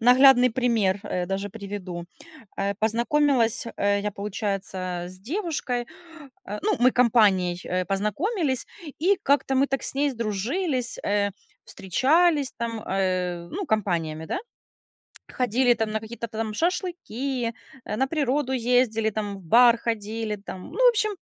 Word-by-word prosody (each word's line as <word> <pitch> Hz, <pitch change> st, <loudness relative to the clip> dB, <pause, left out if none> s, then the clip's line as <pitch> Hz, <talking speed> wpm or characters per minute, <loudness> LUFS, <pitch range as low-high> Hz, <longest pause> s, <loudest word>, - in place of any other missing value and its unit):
наглядный 250 Hz, +1 st, +7 dB
пример, 225 Hz, -5 st, +1 dB
э, 180 Hz, -3 st, -3 dB
даже 195 Hz, +2 st, -3 dB
приведу. 195 Hz, -4 st, -6 dB, 0.5 s
Э, 200 Hz, 0 st, 0 dB
познакомилась, 235 Hz, +1 st, +2 dB
э, 200 Hz, 0 st, +1 dB
я, 210 Hz, +1 st, -2 dB
получается, 200 Hz, -1 st, -3 dB, 0.3 s
с 185 Hz, 0 st, -11 dB
девушкой, 265 Hz, -, -3 dB, 0.6 s
э, 210 Hz, +1 st, -5 dB
ну, 425 Hz, -1 st, +1 dB
мы 250 Hz, +1 st, +6 dB
компанией, 205 Hz, -7 st, +4 dB
э, 180 Hz, 0 st, -1 dB
познакомились, 260 Hz, -, -1 dB, 0.3 s
и 375 Hz, +5 st, +3 dB
как-то 280 Hz, -1 st, +2 dB
мы 270 Hz, +1 st, +3 dB
так 270 Hz, 0 st, -2 dB
с -, -, -2 dB
ней 285 Hz, +1 st, +1 dB
сдружились, 245 Hz, -, -2 dB
э, 205 Hz, 0 st, +1 dB, 0.3 s
встречались, 290 Hz, -, +2 dB
там, 230 Hz, -2 st, -3 dB
э, 185 Hz, -3 st, -1 dB
ну, 385 Hz, +1 st, -4 dB
компаниями, 170 Hz, -, -1 dB
да. -, -, -2 dB, 0.9 s
Ходили, 250 Hz, 0 st, +2 dB
там, 225 Hz, -1 st, -2 dB
на 220 Hz, -, -1 dB
какие-то 235 Hz, +1 st, -6 dB
там 220 Hz, -1 st, -4 dB
шашлыки, 275 Hz, -, -2 dB, 0.3 s
э, -, -, -4 dB
на 265 Hz, +4 st, +2 dB
природу 280 Hz, -3 st, 0 dB
ездили, 240 Hz, -3 st, +2 dB
там, 205 Hz, -2 st, -4 dB
в -, -, -14 dB
бар 235 Hz, +7 st, +6 dB
ходили, 220 Hz, -1 st, -3 dB
там, 190 Hz, -2 st, -9 dB
ну, -, -, +3 dB
в -, -, +9 dB
общем, 430 Hz, -2 st, 0 dB
230 Hz, 140 wpm, -25 LUFS, 200-265 Hz, 0.9 s, в